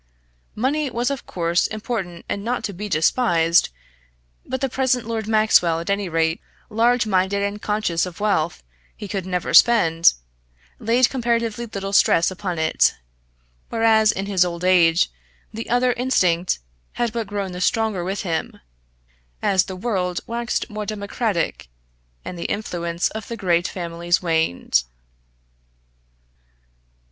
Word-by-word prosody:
Money 280 +6 0
was 240 +2 -1
of 275 - -5
course 170 -1 0
important 210 -6 -5
and 200 - -3
not 245 +2 -2
to 200 - -3
be 205 +3 -6
despised, 170 -1 +3 0.7
but 260 +1 -4
the 270 - 0
present 255 -2 0
Lord 225 -2 -3
Maxwell, 215 -7 +3
at 170 +4 -3
any 200 -2 -1
rate, 160 0 0 0.3
large 235 +2 +3
minded 195 0 +1
and 200 +1 -3
conscious 210 -5 0
of 175 - -10
wealth 190 - 0 0.3
he 205 - -7
could 195 -2 -4
never 180 -1 -2
spend, 165 -9 +6 0.7
laid 235 +3 +3
comparatively 235 -2 -1
little 195 -2 -5
stress 170 -3 +4
upon 185 -2 -4
it; 160 0 +2 0.7
whereas, 220 -1 +4
in 195 - -4
his 195 -3 +3
old 175 -1 -4
age, 170 - +4 0.4
the 225 +1 -6
other 245 +1 +2
instinct 185 -9 +1 0.4
had 235 -2 -1
but 230 -3 -3
grown 200 -2 -3
the 180 0 -6
stronger 220 -3 +1
with 195 +3 -3
him, 165 -4 -3 0.8
as 190 -1 +2
the 190 - -7
world 185 -3 -2
waxed 235 +1 -2
more 210 -2 -6
democratic, 205 - -2 0.6
and 180 - -6
the - - -5
influence 170 -4 -2
of 220 -1 -7
the 230 - -5
great 175 -3 +1
families 170 -1 -1
waned. 160 - +1
200 Hz, 140 wpm, -22 LUFS, 175-230 Hz, 0.8 s, spend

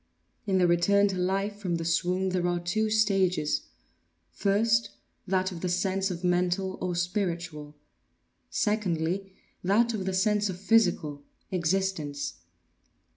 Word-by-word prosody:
In 190 -1 +2
the 180 - +4
return 200 +4 +4
to 190 - -2
life 195 +3 -1
from 185 -4 -2
the 165 0 -3
swoon 180 +3 +1
there 180 -1 0
are 175 0 0
two 215 +6 0
stages; 195 -7 +1 0.6
first, 220 - +2 0.4
that 185 0 +1
of 170 -2 -7
the 180 - -1
sense 190 +2 0
of 175 -1 -5
mental 180 +1 0
or 180 -1 -1
spiritual; 170 -5 -3 0.7
secondly, 190 -2 -1 0.3
that 225 +5 +3
of 200 -4 -3
the 190 - -1
sense 210 +1 +2
of 180 -1 -5
physical, 180 -9 +2 0.3
existence. 170 - -1
185 Hz, 130 wpm, -28 LUFS, 175-200 Hz, 0.7 s, the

